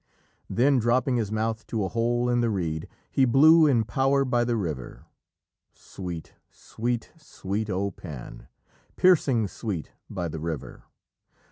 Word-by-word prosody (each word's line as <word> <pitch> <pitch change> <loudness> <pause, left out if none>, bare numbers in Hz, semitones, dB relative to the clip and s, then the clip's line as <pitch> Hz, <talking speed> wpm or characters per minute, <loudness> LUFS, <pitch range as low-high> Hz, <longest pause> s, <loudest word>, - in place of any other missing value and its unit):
Then, 135 +2 +3
dropping 120 +2 +2
his 110 -3 -2
mouth 110 +1 -2
to 110 -3 -1
a - - -1
hole 120 +2 0
in 120 0 +2
the 120 - +1
reed, 80 -6 -2 0.2
He 135 - +3
blew 155 +6 +6
in 120 -6 +3
power 135 +5 +1
by 120 -2 +1
the 120 0 0
river. 80 - -5 0.7
Sweet, 90 -4 -8 0.2
sweet, 120 0 -4
sweet, 105 -8 -4
O 100 +1 -1
Pan! 75 -8 -10 0.5
Piercing 140 - +4
sweet 95 -5 -5 0.2
by 90 -3 -3
the 80 0 -5
river! 80 -2 -6
115 Hz, 140 wpm, -26 LUFS, 95-125 Hz, 0.7 s, blew